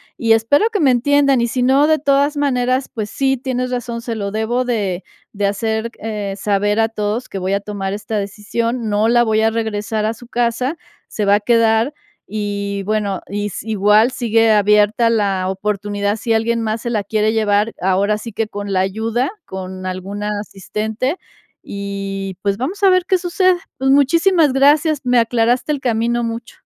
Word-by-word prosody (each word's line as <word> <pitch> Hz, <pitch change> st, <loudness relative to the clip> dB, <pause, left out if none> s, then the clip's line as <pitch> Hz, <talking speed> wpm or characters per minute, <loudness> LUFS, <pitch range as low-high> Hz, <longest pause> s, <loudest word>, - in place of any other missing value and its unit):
Y 225 Hz, -1 st, +3 dB
espero 225 Hz, -, +3 dB
que 420 Hz, -, -1 dB
me 280 Hz, -6 st, +4 dB
entiendan, 275 Hz, +1 st, +3 dB
y 235 Hz, -, +1 dB
si 250 Hz, +2 st, -2 dB
no, 270 Hz, +3 st, +4 dB
de 315 Hz, 0 st, +4 dB
todas 280 Hz, +1 st, +2 dB
maneras, 255 Hz, -2 st, +1 dB
pues 215 Hz, -2 st, -4 dB
sí, 270 Hz, +3 st, +1 dB
tienes 255 Hz, 0 st, -3 dB
razón, 240 Hz, -1 st, -3 dB
se 230 Hz, -1 st, -4 dB
lo 200 Hz, -2 st, -3 dB
debo 225 Hz, +4 st, -1 dB
de 200 Hz, -7 st, -2 dB, 0.3 s
de 205 Hz, -1 st, -1 dB
hacer, 220 Hz, +3 st, -1 dB
c 210 Hz, -2 st, -4 dB
eh, -, -, -5 dB
saber 205 Hz, +1 st, 0 dB
a 225 Hz, 0 st, +3 dB
todos 215 Hz, +2 st, -3 dB
que -, -, -6 dB
voy 190 Hz, +1 st, -1 dB
a 200 Hz, -, +1 dB
tomar 200 Hz, -1 st, -4 dB
esta 210 Hz, +1 st, -4 dB
decisión, 220 Hz, +3 st, -3 dB
no 210 Hz, +2 st, +2 dB
la 240 Hz, 0 st, +4 dB
voy 220 Hz, -1 st, +1 dB
a 225 Hz, 0 st, +3 dB
regresar 220 Hz, -1 st, -2 dB
a 220 Hz, +1 st, -1 dB
su 240 Hz, +2 st, -14 dB
casa, 245 Hz, +4 st, -1 dB, 0.3 s
se 210 Hz, -, -3 dB
va 200 Hz, 0 st, +5 dB
a -, -, +2 dB
quedar, 230 Hz, +3 st, +2 dB, 0.3 s
y 200 Hz, -1 st, -3 dB
bueno, 205 Hz, -1 st, -1 dB
y 205 Hz, +1 st, -3 dB
si 210 Hz, +2 st, -7 dB
igual 210 Hz, +3 st, +4 dB
sigue 225 Hz, -3 st, +2 dB
abierta 210 Hz, +2 st, +3 dB
la 200 Hz, -4 st, 0 dB
oportunidad 205 Hz, +1 st, -2 dB
si 225 Hz, +1 st, -1 dB
alguien 230 Hz, +1 st, +1 dB
más 220 Hz, 0 st, -2 dB
se 235 Hz, -, -3 dB
la 215 Hz, -3 st, -1 dB
quiere 215 Hz, +1 st, +1 dB
llevar, 215 Hz, 0 st, +1 dB
ahora 195 Hz, +3 st, +1 dB
sí 225 Hz, +1 st, -8 dB
que 225 Hz, +1 st, -1 dB
con 205 Hz, -1 st, -5 dB
la 185 Hz, -, +2 dB
ayuda, 225 Hz, +6 st, -1 dB, 0.2 s
con 185 Hz, 0 st, -7 dB
algún 185 Hz, +2 st, -5 dB
asistente, 210 Hz, -, -3 dB, 0.5 s
y 195 Hz, -1 st, -4 dB
pues, 200 Hz, -1 st, 0 dB
vamos 320 Hz, -, -4 dB
a 390 Hz, -, +7 dB
ver 370 Hz, -1 st, +3 dB
qué 375 Hz, -, +2 dB
sucede. 365 Hz, +1 st, +2 dB, 0.2 s
Pues, 265 Hz, +1 st, +1 dB
muchísimas 315 Hz, +2 st, +4 dB
gracias, 290 Hz, +2 st, +3 dB
me 250 Hz, -1 st, +3 dB
aclaraste 235 Hz, +4 st, +1 dB
el 285 Hz, -, -4 dB
camino 235 Hz, -1 st, 0 dB
mucho. 230 Hz, 0 st, -5 dB
220 Hz, 190 wpm, -18 LUFS, 205-250 Hz, 0.5 s, a